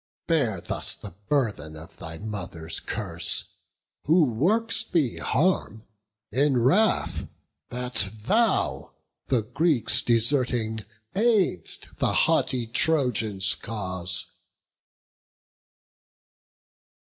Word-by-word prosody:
Bear 130 - +1
thus - - 0
the - - -9 0.2
burthen 110 - -1
of 80 +1 -12
thy 80 0 -7
mother's 90 -6 -4
curse, - - -1 0.5
Who 165 +3 +5
works 190 - +1
thee 160 - 0
harm, 140 - 0 0.5
in 135 +3 +2
wrath 145 - +2 0.4
that 125 -5 0
thou 110 - 0 0.3
the 125 -5 +1
Greeks 130 -2 +2
Deserting, 115 -2 +1 0.3
aid'st 205 - 0
the - - +1
haughty 125 -2 +1
Trojans' 115 -7 +1
cause." 95 -5 -4
120 Hz, 85 wpm, -25 LUFS, 105-150 Hz, 0.5 s, Who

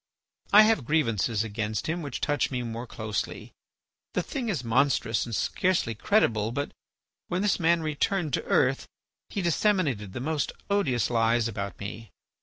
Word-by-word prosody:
I 210 +2 +9
have 215 - +3
grievances 115 - +1
against 110 0 -3
him 170 +2 -2
which 140 -5 -5
touch 145 -1 +1
me 125 -2 -2
more 115 +1 -5
closely. 110 -2 -4 0.6
The 180 - +1
thing 245 +2 -4
is 160 - -1
monstrous 120 -1 +1
and 115 - -3
scarcely 180 - +1
credible, 110 - +2
but 140 +4 -3 0.6
when 180 +3 -1
this 205 -2 +2
man 170 -1 +3
returned 155 +1 -1
to - - 0
earth 135 0 +2 0.4
he 200 - -3
disseminated 160 - +1
the - - -4
most 150 +3 -1 0.2
odious 135 - +1
lies 115 0 +2
about 100 -4 -5
me. 105 +2 -7
130 Hz, 155 wpm, -27 LUFS, 115-170 Hz, 0.6 s, I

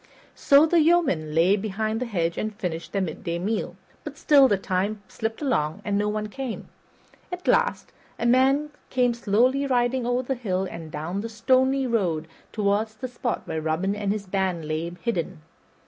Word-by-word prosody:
So 280 +2 +5
the 335 +1 +3
yeomen 285 - +2
lay 175 +5 +5
behind 215 +2 -2
the 255 - -3
hedge 170 -6 -1
and 215 -1 -3
finished 170 -5 -4
their 195 -1 0
midday 170 -1 -4
meal; 210 +6 -2 0.3
but - - -8
still 280 -3 +6
the 205 -5 +2
time 195 +3 -2
slipped 220 +7 -4
along 195 - -1
and 205 - 0
no 205 +1 +1
one 210 0 -2
came. 255 +2 -6 0.6
At 360 0 -6
last, 480 0 +1 0.3
a - - -3
man 270 +5 +3 0.2
came 250 -2 +2
slowly 245 +5 +2
riding 245 -1 +1
over 245 +1 +1
the 270 - -1
hill 195 -7 -2
and 165 -2 -8
down 165 +6 -3
the 230 - -5
stony 260 +4 +2
road 180 -10 0 0.2
toward 210 +1 +1
the 255 - -3
spot 245 -1 -3
where 160 - -3
Robin 165 +6 -1
and 205 -1 -1
his 205 -1 -3
band 185 -4 -1
lay 155 +2 -2
hidden. 175 -9 -2
215 Hz, 180 wpm, -25 LUFS, 185-255 Hz, 0.6 s, still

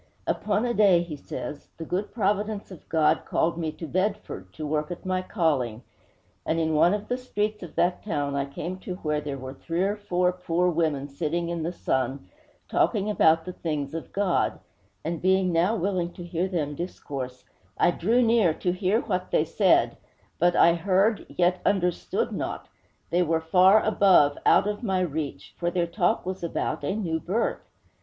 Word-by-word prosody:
'Upon 215 +2 0
a 240 - 0
day,' 195 -6 +5
he 165 -3 -6
says, 145 +1 -7
'the 165 - -6
good 190 +5 -2
providence 210 -1 -1
of 180 - -13
God 155 -1 +3
called 165 +1 0
me 160 -2 -2
to 165 - -7
Bedford, 185 - -2
to 155 - -6
work 150 +1 -1
at 175 - -7
my 185 0 0
calling; 140 - -1 0.6
and 165 - 0
in 160 -1 +1
one 170 +5 +4
of 210 0 -6
the 250 - -2
streets 210 -4 -2
of 175 - -9
that 180 +1 +1
town 145 -8 -2
I 140 0 0
came 170 +6 -6
to 185 -1 -6
where 150 -4 -2
there 145 -2 -4
were 130 0 -7
three 165 +5 -2
or 200 +2 +1
four 180 -3 +1
poor 180 0 0
women 155 -4 0
sitting 165 +4 -2
in 170 -1 -2
the 165 +2 -2
sun 130 - -2 0.4
talking 210 0 +1
about 160 -5 +4
the 180 - -5
things 150 -5 -3
of 165 - -6
God; 195 -3 +1 0.5
and 165 0 -3
being 185 -1 +2
now 175 +7 +2
willing 185 -3 -1
to 175 - -9
hear 175 +1 -1
them 155 -6 -2
discourse, 135 -6 -6 0.3
I - - +4
drew 225 +9 +2
near 225 -8 +3
to 180 - -1
hear 185 +5 +1
what 185 -3 -2
they 155 - +2
said; 185 +3 +3 0.4
but 175 +1 +3
I 170 - +6
heard, 195 +5 +1
yet 180 +1 +1
understood 180 -3 0
not; - - -4 0.4
they 175 - +3
were 165 -2 +2
far 185 +5 +5
above, 190 -9 +5
out - - +5
of 210 +2 -3
my 190 -6 0
reach; 145 - -4
for 175 - 0
their 175 0 0
talk 175 +1 0
was 185 -1 -4
about 170 - -2
a 190 - -1
new 170 -7 -1
birth!' 200 +8 -2
175 Hz, 185 wpm, -26 LUFS, 160-190 Hz, 0.6 s, I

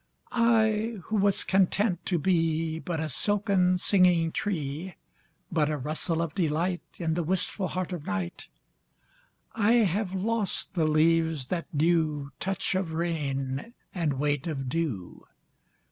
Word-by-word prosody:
I 225 -1 +2
who 220 - -3
was 200 -1 +3
content 190 0 +1
to 180 - +1
beBut 165 -1 0
a 160 - -1
silken 190 +2 +2
singing 180 -3 +3
tree, 165 -2 -3 0.6
But 155 -3 +2
a 150 - -1
rustle 155 +4 0
of 160 -3 -4
delightIn 170 0 -1
the 175 - 0
wistful 185 +3 0
heart 185 0 -3
of 165 -5 -6
night,I 95 - -5
have 205 -4 +2
lost 210 +1 -1
the 165 -4 +1
leaves 160 -2 +2
that 175 -2 -2
knewTouch 155 +2 0
of 185 -4 -1
rain 145 - -2 0.2
and 165 -6 0
weight 145 +2 -1
of 135 -5 -3
dew. 125 - -3
170 Hz, 120 wpm, -28 LUFS, 155-190 Hz, 0.6 s, was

